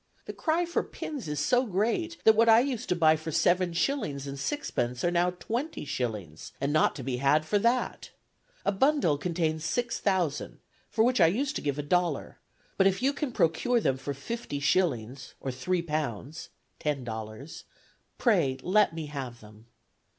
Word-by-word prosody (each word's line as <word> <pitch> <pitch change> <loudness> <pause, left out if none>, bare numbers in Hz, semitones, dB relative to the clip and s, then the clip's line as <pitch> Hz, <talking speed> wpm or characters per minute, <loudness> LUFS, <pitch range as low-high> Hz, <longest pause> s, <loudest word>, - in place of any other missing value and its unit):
The - - -6
cry 330 +2 0
for 340 - 0
pins 285 - -6
is 150 -1 -2
so 245 - +3
great 235 - -1
that 220 - +7
what 230 +1 +5
I 225 0 +8
used 255 -3 -3
to 180 - +2
buy 160 -2 +5
for 160 +1 -5
seven 175 +3 +2
shillings 165 - -1
and 140 0 -6
sixpence 125 - -2
are 175 - +2
now 175 +1 +2
twenty 230 - -4
shillings, 105 - -4
and 140 +1 -1
not 155 - +3
to 135 - -6
be 125 -1 -2
had 140 +4 +3
for 205 +6 +1
that. 235 +4 0 0.6
A - - +3
bundle 205 - +2
contains 160 -2 -1
six 235 +8 -1
thousand, 185 -7 -1 0.3
for 220 +1 +2
which 250 +1 +3
I - - +8
used 270 - 0
to - - -5
give 145 -1 -2
a 145 - -2
dollar; 175 -1 0 0.4
but 190 - +5
if 195 +5 0
you 275 +2 +3
can 285 -2 -3
procure 230 +7 +2
them 135 - +1
for 140 +1 -5
fifty 230 - -5
shillings, 135 -5 0
or 135 - -3
three 170 +8 -1
pounds 150 -2 -4 0.3
(ten 145 -3 -1
dollars), 110 +5 -7 0.5
pray 170 - +2
let 200 -2 +3
me 160 -2 -4
have 135 -5 -6
them. 105 +1 -16
165 Hz, 180 wpm, -28 LUFS, 140-225 Hz, 0.6 s, I